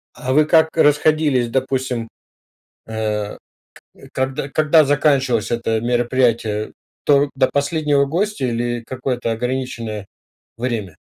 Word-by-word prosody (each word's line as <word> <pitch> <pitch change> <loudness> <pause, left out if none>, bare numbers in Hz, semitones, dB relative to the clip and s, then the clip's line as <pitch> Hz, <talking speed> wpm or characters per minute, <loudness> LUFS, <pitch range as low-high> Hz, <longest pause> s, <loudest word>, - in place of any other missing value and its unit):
А 130 +1 -2
вы 150 +2 +5
как 160 0 +3
расходились, 150 -4 +3
допустим, 130 -2 -1 0.8
э, 105 -2 -3
к - - -20 0.7
когда 130 +1 -2
когда 155 +2 +4
заканчивалось 140 -5 +1
это 115 -1 0
мероприятие? 120 -3 0 0.3
То 145 0 +3
до 130 -1 +2
последнего 145 0 +1
гостя 175 +1 -1
или 120 0 -2
какое-то 125 -2 -2
ограниченное 115 -3 -4 0.5
время? 115 -8 -3
130 Hz, 110 wpm, -19 LUFS, 115-145 Hz, 0.8 s, вы